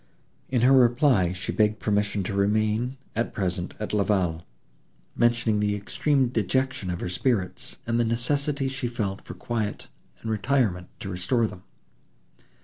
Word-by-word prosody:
In 125 Hz, -3 st, +1 dB
her 125 Hz, +3 st, +5 dB
reply, 120 Hz, -, +4 dB
she 90 Hz, +1 st, -4 dB
begged 110 Hz, 0 st, +2 dB
permission 105 Hz, -1 st, 0 dB
to 95 Hz, -, -3 dB
remain, 110 Hz, +5 st, +1 dB, 0.2 s
at 115 Hz, +2 st, -2 dB
present, 90 Hz, -2 st, -2 dB
at 105 Hz, -, -4 dB
La 105 Hz, -1 st, +3 dB
Vallée, 90 Hz, -6 st, 0 dB, 0.7 s
mentioning 120 Hz, -2 st, +2 dB
the 105 Hz, 0 st, +1 dB
extreme 130 Hz, +6 st, +1 dB
dejection 120 Hz, -1 st, 0 dB
of 90 Hz, -1 st, -3 dB
her -, -, -2 dB
spirits, 95 Hz, +1 st, -1 dB
and 115 Hz, 0 st, 0 dB
the -, -, +4 dB
necessity 135 Hz, +4 st, 0 dB
she 130 Hz, -2 st, -2 dB
felt 105 Hz, -5 st, -3 dB
for -, -, -9 dB
quiet 110 Hz, -4 st, -3 dB, 0.3 s
and 110 Hz, -, -2 dB
retirement 110 Hz, -5 st, +1 dB
to 100 Hz, -, -5 dB
restore 95 Hz, +6 st, +1 dB
them. 105 Hz, -4 st, -6 dB
110 Hz, 150 wpm, -26 LUFS, 100-125 Hz, 0.7 s, her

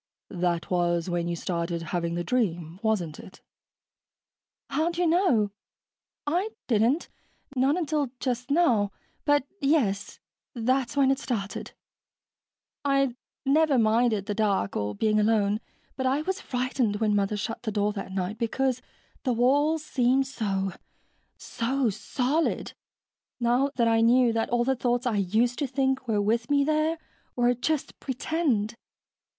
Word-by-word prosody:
"That 175 Hz, -2 st, -1 dB
was 175 Hz, -1 st, +1 dB
when 170 Hz, -1 st, -1 dB
you 170 Hz, -, -1 dB
started 170 Hz, -1 st, -2 dB
having 170 Hz, -1 st, -1 dB
the 175 Hz, -, -2 dB
dream, 175 Hz, -8 st, -1 dB
wasn't 195 Hz, -9 st, -1 dB
it?" 185 Hz, -, -12 dB, 1.3 s
"How'd 335 Hz, +2 st, 0 dB
you 355 Hz, -, +2 dB
know? 320 Hz, -, +3 dB, 0.7 s
I 355 Hz, +8 st, 0 dB, 0.2 s
didn't 235 Hz, +7 st, +2 dB, 0.5 s
not 270 Hz, +5 st, +3 dB
until 305 Hz, -5 st, 0 dB
just 250 Hz, 0 st, -2 dB
now. 245 Hz, -, +3 dB, 0.3 s
But, 290 Hz, -2 st, +3 dB, 0.2 s
yes, 260 Hz, -9 st, +1 dB, 0.4 s
that's 255 Hz, +4 st, 0 dB
when 270 Hz, -1 st, +5 dB
it 270 Hz, -, 0 dB
started. 205 Hz, -6 st, -4 dB, 1.1 s
I'd 275 Hz, -3 st, +2 dB, 0.3 s
never 295 Hz, 0 st, +4 dB
minded 220 Hz, -2 st, +2 dB
the 205 Hz, -, -2 dB
dark 200 Hz, -, 0 dB
or 105 Hz, 0 st, -2 dB
being 215 Hz, -1 st, +2 dB
alone, 210 Hz, -1 st, +2 dB, 0.4 s
but 260 Hz, -1 st, -1 dB
I 275 Hz, +4 st, +1 dB
was 380 Hz, +3 st, -2 dB
frightened 250 Hz, -3 st, -1 dB
when 210 Hz, 0 st, +1 dB
Mother 205 Hz, +1 st, +1 dB
shut 225 Hz, +3 st, -4 dB
the 220 Hz, -, -3 dB
door 205 Hz, 0 st, 0 dB
that 195 Hz, -2 st, -6 dB
night, 190 Hz, +3 st, -3 dB
because 255 Hz, +2 st, 0 dB, 0.4 s
the 255 Hz, -, 0 dB
walls 290 Hz, +6 st, +2 dB
seemed 260 Hz, 0 st, +2 dB
so... 195 Hz, -7 st, -2 dB, 0.7 s
so 245 Hz, 0 st, -1 dB
solid, 265 Hz, -, -1 dB, 0.7 s
now 245 Hz, +3 st, +2 dB
that 235 Hz, -2 st, +2 dB
I 225 Hz, 0 st, +3 dB
knew 240 Hz, +1 st, +5 dB
all 240 Hz, 0 st, +1 dB
the 265 Hz, +2 st, +1 dB
thoughts 245 Hz, 0 st, 0 dB
I 230 Hz, -4 st, +1 dB
used 220 Hz, +6 st, +1 dB
to 285 Hz, -, 0 dB
think 265 Hz, 0 st, 0 dB
were 215 Hz, -2 st, +1 dB
with 230 Hz, +4 st, 0 dB
me 285 Hz, -1 st, +4 dB
there 310 Hz, +2 st, +1 dB, 0.4 s
were 245 Hz, 0 st, +3 dB
just 285 Hz, +4 st, -2 dB
pretend. 260 Hz, -5 st, -1 dB
240 Hz, 140 wpm, -27 LUFS, 205-275 Hz, 1.3 s, when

